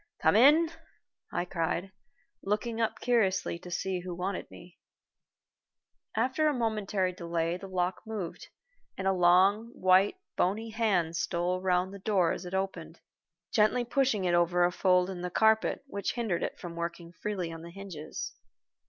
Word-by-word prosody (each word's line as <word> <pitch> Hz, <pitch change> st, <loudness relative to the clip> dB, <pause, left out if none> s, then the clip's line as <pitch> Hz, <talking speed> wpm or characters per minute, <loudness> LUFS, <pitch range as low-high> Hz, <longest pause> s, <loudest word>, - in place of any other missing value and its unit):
"Come -, -, +3 dB
in," 300 Hz, +8 st, +6 dB, 0.6 s
I 175 Hz, -, -1 dB
cried, 175 Hz, +1 st, -2 dB, 0.5 s
looking 220 Hz, +3 st, -1 dB
up 225 Hz, -, -1 dB
curiously 195 Hz, -8 st, +1 dB
to 180 Hz, -, -10 dB
see 185 Hz, +1 st, -2 dB
who 180 Hz, 0 st, -6 dB
wanted 185 Hz, +2 st, -3 dB
me. 175 Hz, -, -14 dB, 1.4 s
After 260 Hz, +7 st, +2 dB
a 300 Hz, -, +2 dB
momentary 210 Hz, -5 st, 0 dB
delay, 170 Hz, -2 st, -2 dB
the 195 Hz, -, -9 dB
lock 180 Hz, -1 st, -1 dB
moved, 205 Hz, -6 st, -5 dB, 0.5 s
and 190 Hz, -, -4 dB
a 195 Hz, -, +4 dB
long, 185 Hz, +5 st, +4 dB
white, 185 Hz, -, +4 dB, 0.2 s
bony 220 Hz, +5 st, 0 dB
hand 190 Hz, -7 st, +1 dB
stole 175 Hz, +2 st, -1 dB
round 185 Hz, 0 st, +1 dB
the 200 Hz, -, -8 dB
door 190 Hz, -4 st, +2 dB
as -, -, -4 dB
it 180 Hz, +2 st, -4 dB
opened, 175 Hz, -4 st, -4 dB, 0.5 s
gently 220 Hz, +3 st, +3 dB
pushing 240 Hz, -6 st, +1 dB
it 175 Hz, -, +2 dB
over 175 Hz, +1 st, +3 dB
a 175 Hz, -, +1 dB
fold 180 Hz, 0 st, +3 dB
in 180 Hz, -2 st, -6 dB
the 180 Hz, -, -3 dB
carpet 220 Hz, +7 st, +2 dB
which 200 Hz, -7 st, -3 dB
hindered 225 Hz, -8 st, -1 dB
it -, -, -3 dB
from 170 Hz, -2 st, -8 dB
working 170 Hz, 0 st, -5 dB
freely 180 Hz, -3 st, -4 dB
on 165 Hz, -, -8 dB
the 170 Hz, -, -9 dB
hinges. 175 Hz, -4 st, -7 dB
190 Hz, 160 wpm, -30 LUFS, 175-215 Hz, 1.4 s, in